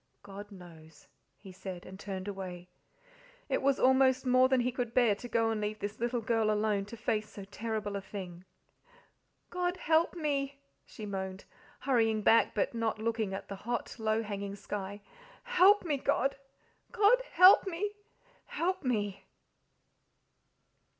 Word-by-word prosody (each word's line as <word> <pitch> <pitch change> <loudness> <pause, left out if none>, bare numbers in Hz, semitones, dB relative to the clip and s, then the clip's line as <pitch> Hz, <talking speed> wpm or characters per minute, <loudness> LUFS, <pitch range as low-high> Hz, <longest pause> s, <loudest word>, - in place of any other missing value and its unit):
"God 205 +1 -10
knows!" 160 -5 -14 0.3
he 195 - -12
said, 185 -1 -8
and 190 +1 -11
turned 190 -1 -6
away. 185 -3 -6 0.8
It - - 0
was 275 0 +2
almost 260 0 +4
more 255 0 +4
than 260 -2 +3
he 250 +1 0
could 240 -2 -4
bear 240 -4 +5
to 230 +5 -8
go 225 -1 +1
and 215 -1 -2
leave 210 +1 -2
this 205 0 -5
little 240 +1 -1
girl 225 -1 +1
alone 210 -1 +1
to 230 +3 -10
face 215 -1 -1
so 200 -2 -9
terrible 215 0 -4
a 200 - -3
thing. 185 -3 -8 1.1
"God 360 0 -1
help 325 +2 +2
me!" 280 -4 -2 0.3
she 215 - -9
moaned, 190 -1 -5 0.4
hurrying 225 -5 +2
back, 230 +2 +4
but - - 0
not 230 -2 -1
looking 220 -2 -1
at - - -7
the 200 - -7
hot, 240 +4 -4
low 220 0 0
hanging 200 -1 -5
sky. 205 0 -6 0.4
"Help 415 -5 +5
me, 300 -4 0
God! 275 +1 +1 0.6
God, 465 +2 +4
help 370 +2 +8
me, 385 +3 -2 0.6
help 365 +1 -2
me!" 205 -6 -2
220 Hz, 150 wpm, -31 LUFS, 200-260 Hz, 1.1 s, help